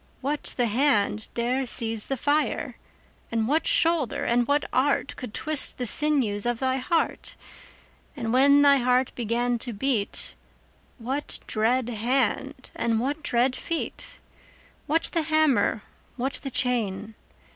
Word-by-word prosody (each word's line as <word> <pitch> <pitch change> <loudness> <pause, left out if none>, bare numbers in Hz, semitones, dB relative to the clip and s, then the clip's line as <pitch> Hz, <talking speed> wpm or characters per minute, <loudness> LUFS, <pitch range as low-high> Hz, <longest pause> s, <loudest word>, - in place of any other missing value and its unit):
What 290 +3 -3
the 245 - +2
hand 220 -3 +1
dare 250 +3 -1
seize 225 -3 -1
the 270 - -2
fire? 290 +5 0 0.6
And 225 -1 0
what 310 +5 +1
shoulder 325 -7 +2
and 240 0 +1
what 290 +1 +1
art 275 +2 +1
Could 250 - -7
twist 305 +5 +1
the 250 - -3
sinews 240 -5 +2
of 240 -1 0
thy 260 +1 0
heart? 320 +5 -1 0.8
10 250 -5 -5
And 225 - -1
when 280 +2 +5
thy 280 -1 +6
heart 250 0 +1
began 240 +1 -1
to 240 0 -4
beat, 215 -1 -2 0.6
What 265 +4 -3
dread 235 +3 0
hand 255 +4 -1
and 230 -1 0
what 285 +6 -2
dread 250 -1 +1
feet? 335 +5 -4 0.7
What 325 +3 +1
the 335 - +2
hammer? 310 -8 +2 0.3
what 265 +2 -2
the 275 - -5
chain? 225 -5 -1
255 Hz, 140 wpm, -25 LUFS, 230-285 Hz, 0.8 s, thy